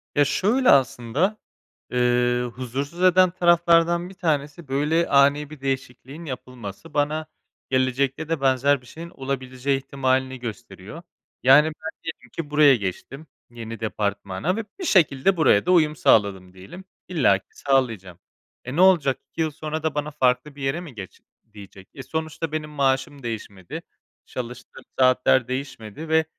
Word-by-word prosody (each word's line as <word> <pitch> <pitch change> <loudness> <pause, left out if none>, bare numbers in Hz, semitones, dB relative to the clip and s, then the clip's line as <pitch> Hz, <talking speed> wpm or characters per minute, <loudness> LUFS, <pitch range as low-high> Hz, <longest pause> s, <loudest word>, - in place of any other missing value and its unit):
Ya, 145 -1 +4
şöyle 240 - +2
aslında, 135 - +2 0.5
eee, 125 0 +2
huzursuz 140 +7 -5
eden 185 0 +5
taraflardan 175 0 +3
1 - - -12
tanesi, 155 -3 -2
böyle, 150 +5 +1
ani 140 +1 +3
bir 155 -3 -12
değişikliğin 135 +3 -5
yapılması. 125 0 -8
Bana 150 +2 0 0.4
gelecekte 135 +4 0
de 165 -4 -1
benzer 135 +1 +2
bir - - -20
şeyin 170 +6 -10
olabileceği 135 -1 -3
ihtimalini 130 -1 -1
gösteriyor. 105 - -8 0.4
Yani, 135 +4 +7
ben 160 +1 -5
diyelim 125 -7 -8
ki 155 -3 -5
buraya 150 -2 +6
geçtim, 120 - -6 0.2
yeni 115 -1 -8
departmana 105 - -2
ve 225 - -3 0.2
bir 370 - -4
şekilde 175 - +3
buraya 130 -10 +4
da 180 - +2
uyum 155 -4 +4
sağladım 95 -7 +2
diyelim. 100 - -12 0.2
İllaki 125 - +2
sağlayacağım. 115 -11 0 0.5
E, 130 +3 -5
ne 175 - +3
olacak? 170 -8 +4
2 165 - -5
yıl 160 -1 0
sonra 155 +1 -5
da 155 -2 -1
bana 150 +1 -2
farklı 130 +2 0
bir 140 - -11
yere 135 +6 -1
mi 150 -9 -11
"Geç." 95 -3 -10 0.3
diyecek? 100 -2 -13
Eee, 135 - -9
sonuçta 160 0 -4
benim 155 -1 -4
maaşım 135 -1 -1
değişmedi, 105 -5 -6 0.4
çalıştığım 125 0 -8 0.2
saatler 130 -1 +4
değişmedi 130 +2 -6
ve 160 0 +3
140 Hz, 145 wpm, -23 LUFS, 125-160 Hz, 0.5 s, Yani